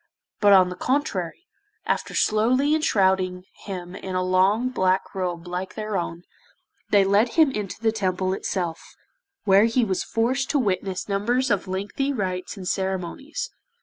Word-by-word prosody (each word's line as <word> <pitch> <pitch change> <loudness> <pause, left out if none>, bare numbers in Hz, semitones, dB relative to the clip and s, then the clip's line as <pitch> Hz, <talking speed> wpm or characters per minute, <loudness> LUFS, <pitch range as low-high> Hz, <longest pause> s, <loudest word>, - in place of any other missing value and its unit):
But 205 -1 +6
on 185 -2 +6
the 180 - -6
contrary, 255 - -2 0.4
after - - -2
slowly 255 +7 +3
enshrouding 190 - +2 0.2
him 180 -2 -6
in 190 -1 -6
a 185 - +1
long 190 +7 +2
black 185 -5 0
robe 180 -3 -3
like 180 +1 -5
their 215 -1 -4
own, 170 -1 -3 0.7
they 200 -1 +5
led 205 +4 +3
him 315 -4 +5
into 210 -5 -5
the 225 0 +2
Temple 185 -3 -1
itself, 175 -4 -4 0.5
where 200 +1 +5
he 230 +1 +2
was 190 -3 -1
forced 255 +4 0
to 295 - +2
witness 190 -5 -1
numbers 235 +6 0
of 200 -1 0
lengthy 200 +9 -2
rites 190 -5 -3
and 185 -2 -7
ceremonies. 190 - -3
195 Hz, 150 wpm, -24 LUFS, 185-230 Hz, 0.7 s, But